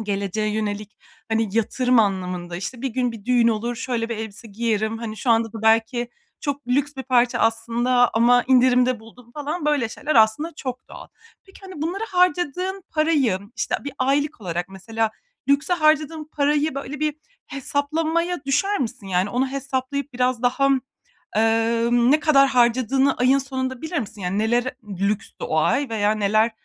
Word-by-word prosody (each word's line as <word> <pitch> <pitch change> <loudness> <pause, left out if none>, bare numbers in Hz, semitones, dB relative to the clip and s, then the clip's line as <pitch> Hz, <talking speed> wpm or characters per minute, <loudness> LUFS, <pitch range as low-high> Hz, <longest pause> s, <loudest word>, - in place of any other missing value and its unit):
geleceğe 205 +1 -2
yönelik, 210 -1 -4 0.3
hani, 225 -1 +1
yatırım 250 +2 +2
anlamında, 180 -4 -1
işte, 230 +7 -6
bir 270 - 0
gün 245 0 -1
bir 215 -3 -11
düğün 240 -2 +3
olur, 230 +2 -1
"Şöyle 230 -1 -2
bir 230 - -3
elbise 220 +1 -7
giyerim, 220 +1 -1
hani, 220 -2 -6
şu 235 +3 -1
anda 225 -1 +2
da 220 -1 -8
belki 225 +2 +2 0.3
çok 285 -2 -4
lüks 285 +3 +1
bir 265 - -4
parça 245 -2 +2
aslında 235 +2 +2
ama 240 +2 +4
indirimde 250 -1 +4
buldum." 235 +2 -17
falan 300 +3 -4
böyle 285 -6 +1
şeyler 295 +6 -3
aslında 225 +9 +3
çok 255 -1 -6
doğal. - - -11 0.4
Peki, 385 - -17
hani, 375 -6 -8
bunlara 375 +7 -2
harcadığın 360 +1 +1
parayı, 300 - +2 0.2
işte, - - -1
bir 285 - -5
aylık 280 +1 0
olarak 175 -1 -3
mesela, 220 +3 -2 0.4
lükse 280 +5 +2
harcadığın 310 -1 +2
parayı, 295 0 +1
böyle, 275 +1 -6
bir 305 -1 0 0.3
hesaplamaya 310 +4 -1
düşer 390 +10 +1
misin? 220 -5 -4
Yani, 185 +2 0
onu 260 +3 0
hesaplayıp 275 +1 -3
biraz 250 -1 0
daha, 275 +3 +2 0.7
eee, 225 +1 +2
ne 245 +5 +4
kadar 275 -3 +5
harcadığını 255 +2 +3
ayın 255 +2 +4
sonunda 260 -2 -4
bilir 320 0 -2
misin? 220 -3 -6
Yani, 185 +2 -2
nelere 240 +4 0 0.2
lükstü 200 +2 -2
o 160 - 0
ay 275 - +2
veya 210 -2 +1
neler 215 +2 +2
245 Hz, 160 wpm, -22 LUFS, 225-280 Hz, 0.7 s, kadar